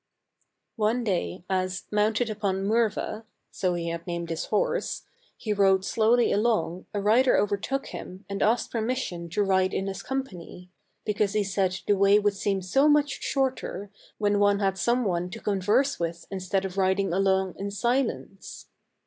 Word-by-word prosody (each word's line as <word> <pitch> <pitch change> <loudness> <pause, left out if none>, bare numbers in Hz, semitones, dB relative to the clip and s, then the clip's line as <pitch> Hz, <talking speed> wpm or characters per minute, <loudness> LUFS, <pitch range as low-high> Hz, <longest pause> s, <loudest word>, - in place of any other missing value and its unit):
One 225 +3 +1
day 185 -3 -2
as, 185 -1 -1
mounted 210 +3 +2
upon 200 -2 -1
Murva 220 0 0 0.3
(so 180 -2 -1
he 170 -1 -3
had 170 +1 -5
named 170 -1 -3
his 165 - -2
horse), - - -1 0.3
he 215 - -2
rode 195 -2 +3
slowly 230 +3 +3
along 205 -5 0
a 205 - -2
rider 230 +6 +4
overtook 210 +7 -1
him 185 +2 -9
and 200 0 -4
asked 230 +3 +2
permission 225 -7 -2
to 205 +5 +1
ride 190 -1 +2
in 195 - -1
his 195 -1 -4
company, 185 -9 -6 0.3
because 210 -1 0
he 210 -1 +2
said 190 -1 -1
the 205 - +3
way 200 +1 +5
would 205 -1 +2
seem 195 -1 -1
so 270 +11 +3
much 295 -1 +2
shorter 260 -7 -2 0.3
when 205 -1 +1
one 205 0 +4
had 195 -2 0
some 240 +5 +1
one 180 -2 -1
to 225 +4 -8
con 200 -3 -1
verse 255 +8 +2
with 170 0 -3
instead 190 0 -1
of 190 0 -6
riding 190 -1 +1
along 190 0 +2
in 200 +1 -3
silence. 235 -1 -2
200 Hz, 165 wpm, -26 LUFS, 190-225 Hz, 0.3 s, way